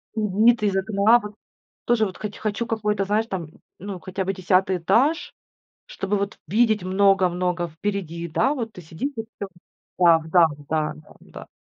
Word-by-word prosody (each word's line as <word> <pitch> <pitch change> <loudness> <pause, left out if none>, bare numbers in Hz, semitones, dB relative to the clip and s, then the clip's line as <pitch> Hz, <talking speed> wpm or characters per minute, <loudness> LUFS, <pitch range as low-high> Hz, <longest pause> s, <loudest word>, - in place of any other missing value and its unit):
М, 210 0 +1
вид 235 -2 +5
из 200 -2 +1
окна, 200 +4 +4
вот. 210 -1 -9 0.5
Тоже 230 -2 +3
вот 190 - -6
хоть 210 -1 -6
хочу 215 +2 -2
какой-то, 210 -3 0
знаешь, 215 +3 +1
там, 180 -6 -4 0.3
ну, 195 -1 -6
хотя 190 +1 -4
бы 195 +1 -1
10 185 0 +1
этаж, 265 - +1 0.5
чтобы 195 +2 -2
вот 200 +1 -3
видеть 215 0 +2
много 190 0 +3
много 175 -1 -1
впереди. 170 -1 -4
Да, 260 - +1
вот, 230 -4 -4
ты 180 - -11
сидишь 165 - -5
и 225 - -2
всё, 215 -3 -9 0.5
да, 170 -2 +6
да, 175 -2 +7 0.2
да, 155 -1 -1
да, 155 - -17
да. - - -12
200 Hz, 175 wpm, -23 LUFS, 180-220 Hz, 0.5 s, да